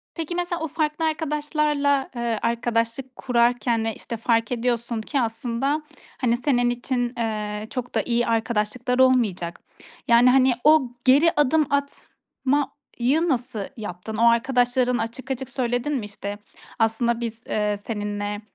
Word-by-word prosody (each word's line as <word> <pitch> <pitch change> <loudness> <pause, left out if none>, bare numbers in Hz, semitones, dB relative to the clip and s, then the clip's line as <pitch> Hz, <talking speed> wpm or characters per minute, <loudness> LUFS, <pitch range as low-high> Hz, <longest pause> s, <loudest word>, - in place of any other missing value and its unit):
Peki 330 +1 -4
mesela 350 -1 -2
o 325 - -1
farklı 310 +1 -1
arkadaşlarla, 300 -2 0
eee, 235 -2 -1
arkadaşlık 235 +2 -1
kurarken 235 -2 +1
ve 225 - -2
işte 230 - -6
fark 230 0 +1
ediyorsun 235 -1 -1
ki 270 +4 -1
aslında, 240 +6 -1 0.4
hani, 240 -1 +2
senin 245 -2 +2
için, 245 0 -2
eee, 215 -2 -3
çok 245 -1 -5
da - - +3
iyi 240 0 0
arkadaşlıklar 230 +2 0
olmayacak. 215 -10 +2 0.5
Yani, 235 +1 +6
hani, 260 0 +5
o 305 -4 +5 0.2
geri 285 +6 +6
adım 295 +1 +3
atmayı 280 +1 -2
nasıl 250 -4 -1 0.2
yaptın? 210 0 -6
O 235 +1 +6
arkadaşların 245 +1 +2
açık 235 +4 -5
açık 265 0 -4
söyledin 245 +3 -1
mi? 230 - -2
İşte 205 0 -6 0.4
aslında 230 +1 +1
biz, 225 -1 -5
eee, 210 -1 0
seninle, 205 -1 -4
245 Hz, 135 wpm, -24 LUFS, 225-270 Hz, 0.5 s, Yani